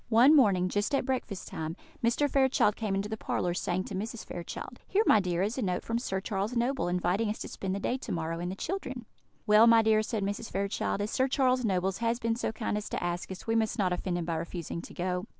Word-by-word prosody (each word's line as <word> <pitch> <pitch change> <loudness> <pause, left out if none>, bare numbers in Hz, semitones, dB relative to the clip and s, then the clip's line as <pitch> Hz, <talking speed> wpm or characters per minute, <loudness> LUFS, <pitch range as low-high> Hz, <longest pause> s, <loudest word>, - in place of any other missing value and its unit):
One 245 +7 +7
morning, 195 -10 +4
just 205 +9 0
at 270 - 0
breakfast 250 -7 -3
time, 160 +1 -4 0.3
Mr. 235 +5 +3
Fairchild 265 -6 +3
came 210 -3 -2
into 195 +1 -1
the 220 +1 -4
parlour, 175 -4 -1
saying 180 +1 -1
to - - -8
Mrs. 215 +4 -4
Fairchild: 175 -1 -7
"Here, 415 +3 +3
my 215 - +6
dear, 180 -2 0
is 220 +6 -1
a - - 0
note 180 -4 -1
from 230 +1 -1
Sir 190 -6 -2
Charles 200 +4 -2
Noble, 245 -2 0
inviting 180 +5 +1
us 210 - -2
to - - -6
spend 190 -1 -3
the - - -2
day 245 +5 -1
to - - -6
morrow, 165 0 -2
and 175 +1 -3
the - - -5
children." 260 - -4 0.4
"Well, 215 +1 +7
my 230 -1 +7
dear," 215 0 +4
said 215 -1 -2
Mrs. 205 +3 -3
Fairchild, 200 +1 -1
"as 205 - -2
Sir 260 - +2
Charles 255 -1 +2
Noble 190 -3 +1
has 230 +4 -1
been 230 -1 0
so 235 - -2
kind 220 -1 -2
as 210 - -7
to - - -3
ask 175 +1 -3
us, 190 - -8
we 225 - 0
must 220 -1 +1
not 185 -3 +2
offend 180 0 -2
him 170 - -2
by 165 -1 -1
refusing 170 0 -5
to - - -11
go." 180 +1 -2
210 Hz, 250 wpm, -29 LUFS, 185-235 Hz, 0.4 s, One